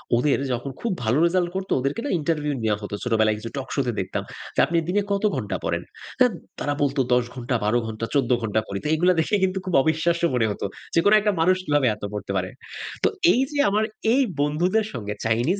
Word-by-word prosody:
ওদের 135 +4 +2 0.2
যখন 130 +3 -4
খুব 235 - -1
ভালো 110 +5 +2
রেজাল্ট 175 0 +1
করতো। 190 0 -4
ওদেরকে 140 - -2
না - - -2
ইন্টারভিউ 150 -2 -1
নেয়া 110 -1 +2
হতো। 105 - -7
ছোটবেলায় 110 -3 +2
কিছু 115 - -6
টকশোতে 135 -1 -1
দেখতাম। 95 0 -3 0.3
যে - - 0
আপনি 170 - 0
দিনে 205 +3 +2
কত 200 +1 0
ঘণ্টা 105 -7 -3
পড়েন? 85 +1 -1 0.4
আ - - +7 0.3
তারা 145 - -1
বলতো, 140 0 +1
"১০ 125 -1 +3
ঘণ্টা, 125 0 -2
১২ 120 +3 +3
ঘণ্টা, 110 +1 -4
১৪ 135 -4 +2
ঘণ্টা 110 0 0
পড়ি।" 100 - -4
তো - - -2
এগুলো 180 +3 +4
দেখে 160 +6 +1
কিন্তু 190 0 +1
খুব 185 - -3
অবিশ্বাস্য 165 +3 +1
মনে 120 -2 +2
হতো। 100 - -4 0.3
যে - - +6
কোন 205 - +6
একটা 210 0 +1
মানুষ 185 +2 +4
কিভাবে 145 -3 +2
এত 105 - -17
পড়তে 105 -1 -4
পারে? 90 0 -2 0.5
তো - - +6 0.3
এইযে 270 +4 0
আমার 210 +2 +2 0.3
এই 270 - +4 0.2
বন্ধুদের 175 +9 +1
সঙ্গে 105 -2 -4
চাইনিজ 120 - +1
145 Hz, 210 wpm, -24 LUFS, 115-180 Hz, 0.5 s, আ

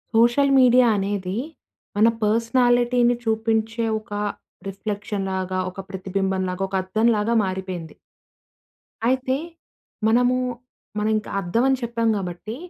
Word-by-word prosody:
Social 240 +5 +4
media 250 0 +6
అనేది 195 -1 -2 0.6
మన 215 +2 +5 0.2
పర్సనాలిటీని 240 +2 +3
చూపించే 225 0 0
ఒక 215 -1 -12 0.5
రిఫ్లెక్షన్ 200 0 -4
లాగా, 185 0 -2
ఒక 185 - -12
ప్రతిబింబం 190 0 -2
లాగా, 180 +1 -3
ఒక 195 - -4
అద్దం 215 +5 +1
లాగా 210 +3 0
మారిపోయింది. 185 -3 -5 1.1
అయితే 260 +1 +1 0.7
మనము 245 +3 +3 0.6
మనం 210 +1 0
ఇంకా 215 - -6
అద్దం 195 +6 0
అని 265 0 +3
చెప్పాం 230 -1 -1
కాబట్టి, 190 +3 -5
215 Hz, 115 wpm, -23 LUFS, 195-240 Hz, 1.1 s, media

